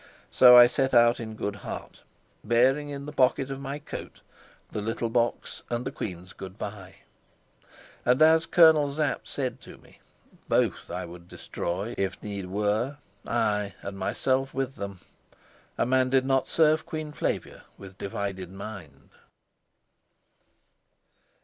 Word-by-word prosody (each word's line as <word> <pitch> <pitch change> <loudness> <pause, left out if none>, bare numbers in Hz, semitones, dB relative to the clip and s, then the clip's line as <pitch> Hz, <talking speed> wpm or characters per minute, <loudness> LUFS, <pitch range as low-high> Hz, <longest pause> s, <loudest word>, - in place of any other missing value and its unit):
So 125 -1 +8
I 120 - +11
set 130 +1 0
out 120 0 +5
in 110 -2 -6
good 100 -1 -4
heart, - - -8 0.4
bearing 130 +5 +2
in 140 -1 -6
the 150 - -6
pocket 135 -1 +2
of 135 - -5
my 140 +1 -4
coat 150 - -9 0.5
the 105 - -3
little 115 +2 -2
box 120 0 -1
and 120 +1 -2
the - - -3
queen's 90 -7 -7
good 95 +1 -10
by. 100 -3 -7 1.1
And, 125 +1 +3
as 160 +1 +5
Colonel 160 -4 +6
Sapt 150 -1 -2
said 130 -3 -3
to - - -12
me, - - -21 0.5
both - - +1
I - - -4
would 85 0 -12
destroy, 95 +6 -4
if 95 -1 -1
need 100 -3 -5
were 105 +8 -1 0.3
ay, 105 -4 0
and 100 - -6
myself 130 +7 -1
with 135 0 -2
them. 100 -2 -7 0.8
A - - +2
man 130 +1 +2
did 130 0 +3
not 135 -1 +1
serve 155 -1 +3
Queen 155 -1 -5
Flavia - - -3
with 95 -1 -13
divided 95 -2 -4
mind. 95 -8 -10
120 Hz, 145 wpm, -27 LUFS, 100-135 Hz, 1.1 s, I